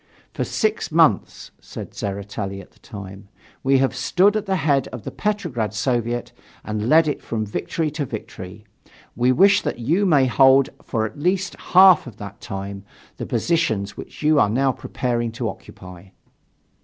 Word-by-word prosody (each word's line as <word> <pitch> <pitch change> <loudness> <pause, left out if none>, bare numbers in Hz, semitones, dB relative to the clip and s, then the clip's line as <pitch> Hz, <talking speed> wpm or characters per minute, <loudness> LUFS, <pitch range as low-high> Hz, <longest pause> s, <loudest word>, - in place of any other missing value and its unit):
"For - - -2
six 215 -4 -1
months," 155 - +2
said - - -9
Tseretelli 100 0 -5
at 95 - -13
that - - -28
time, 100 -1 -10 0.3
"we 135 +1 +3
have 130 -1 +1
stood 185 +11 +2
at 215 -1 -2
the 190 - +1
head 145 -6 +1
of 125 -5 -9
the - - -6
Petrograd 170 - -2
Soviet 120 +1 -1 0.3
and 105 +2 -2
led 160 +1 +5
it 145 - -2
from 110 -2 -3
victory 150 +9 -3
to 150 -1 -3
victory; 105 -2 -8 0.5
we 125 +2 +2
wish 200 +9 +5
that - - -3
you 165 - +1
may 145 -6 +4
hold 135 +1 +5
for 110 -2 -2
at 110 - -8
least 185 +3 0
half 185 -5 +6
of 115 -3 -11
that 100 -2 -9
time 100 0 -6 0.3
the - - -5
positions 110 -13 0
which - - -10
you 155 -1 +4
are 105 - +4
now 135 +5 +2
preparing 120 -2 -3
to - - -3
occupy." 90 0 -10
125 Hz, 170 wpm, -22 LUFS, 105-160 Hz, 0.5 s, half